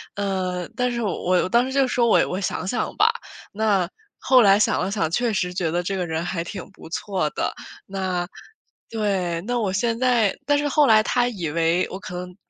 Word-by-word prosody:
呃， 185 -3 -2
但 250 -1 0
是 235 0 -2
我 185 -2 +1
当 235 +5 +3
时 265 - -5
就 270 -1 +2
说： 240 -1 +2
“我 - - +4
我 185 - -3
想 185 - -3
想 240 - -2
吧。” - - +4 0.4
那， 200 -4 +1 0.3
后 255 -1 +5
来 200 -2 +6
想 - - +2
了 185 - -1
想 195 -6 0
确 240 +4 +1
实 180 -2 -1
觉 175 -3 -1
得 175 +1 0
这 195 +2 -2
个 180 -2 -1
人 160 +1 -2
还 170 -2 -2
挺 185 +1 -7
不 - - -13
错 185 -2 -2
的， - - -2 0.3
那 185 -2 -2 0.6
对， 195 -6 -1
那 240 +5 -2
我 200 -4 0
现 230 +4 0
在 240 -5 +2
但 290 0 +4
是 290 0 0
后 290 +1 +4
来 215 -1 +6
他 245 +1 +1
以 180 -9 -4
为 165 +3 +1
我 190 - -6
可 180 -3 -8
能 180 0 -7
195 Hz, 225 characters per minute, -23 LUFS, 180-235 Hz, 0.6 s, 来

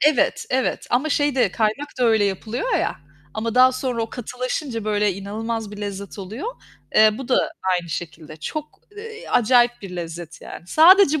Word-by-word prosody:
Evet, 300 -3 +3
evet 260 0 0
ama 260 +6 +2
şey 290 -2 +1
de, 250 -7 +3
kaynak 225 +7 0
da 250 - +2
öyle 220 -3 +4
yapılıyor 215 - -2
ya - - 0 0.4
ama 225 +1 -2
daha 255 +1 +6
sonra 255 -2 -2
o 225 - -5
katılaşınca, 250 0 -4
böyle 210 -1 +1
inanılmaz 220 +2 -4
bir 210 - -9
lezzet 200 -1 -6
oluyor. 210 - -6 0.5
Eee, 215 0 +7
bu 265 -1 -7
da 255 - +3 0.4
aynı 175 -1 -1
şekilde. 160 -2 -6
Çok, 305 - -6 0.2
eee, 445 +2 -9
acayip 240 0 +3
bir 185 -2 -7
lezzet 170 -1 -7
yani. 170 - -10
Sadece 320 - +6
230 Hz, 170 wpm, -22 LUFS, 200-260 Hz, 0.5 s, Eee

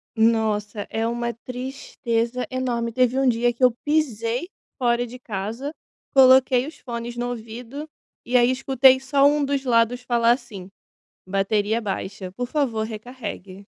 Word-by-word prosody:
Nossa, 220 -2 +1
é 225 +1 -1
uma 235 0 -2
tristeza 250 -1 -3
enorme. 245 -3 -2
Teve 255 +2 +2
um 270 - +2
dia 240 0 +2
que 255 - -5
eu 250 - +7
pisei 260 - 0 0.3
fora 240 -2 +1
de 250 +2 -10
casa, 230 +7 -5 0.4
coloquei 260 -1 +6
os 315 - -10
fones 235 -1 -6
no 245 0 -2
ouvido, 245 +5 -7 0.4
e 250 - -2
aí 245 +1 +5
escutei 265 0 +4
só 275 +1 +2
um 295 0 +4
dos 275 -1 -1
lados 240 0 +2
falar 235 -1 +2
assim: 200 -7 -4 0.6
"Bateria 205 +3 +1
baixa, 195 -2 -5
por 245 +5 -4
favor, 245 -7 -1
recarregue". 215 -4 -8
240 Hz, 145 wpm, -23 LUFS, 225-260 Hz, 0.6 s, eu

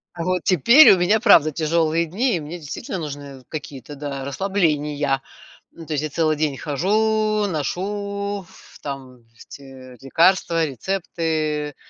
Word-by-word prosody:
Вот 180 +1 -2
теперь 235 - +7
у - - +2
меня, 185 +5 +2
правда, 170 -9 +5
тяжелые 165 +1 +1
дни, 220 +9 0
и - - -4
мне 155 +3 -7
действительно 165 +6 -6
нужны 145 -4 -8
какие-то, 145 -2 -8
да, 140 -1 -5
расслабления. 150 -5 0 0.5
Ну, 165 - -12
то 155 - -4
есть 150 0 -1
я 155 - -2
целый 155 +1 +1
день 150 -2 -1
хожу, 215 - 0
ношу 200 +4 -3
ф - - -17
там 130 -4 -8
эти 130 0 -13
лекарства, 165 +3 +2
рецепты. 155 - -3
160 Hz, 135 wpm, -21 LUFS, 145-190 Hz, 0.5 s, теперь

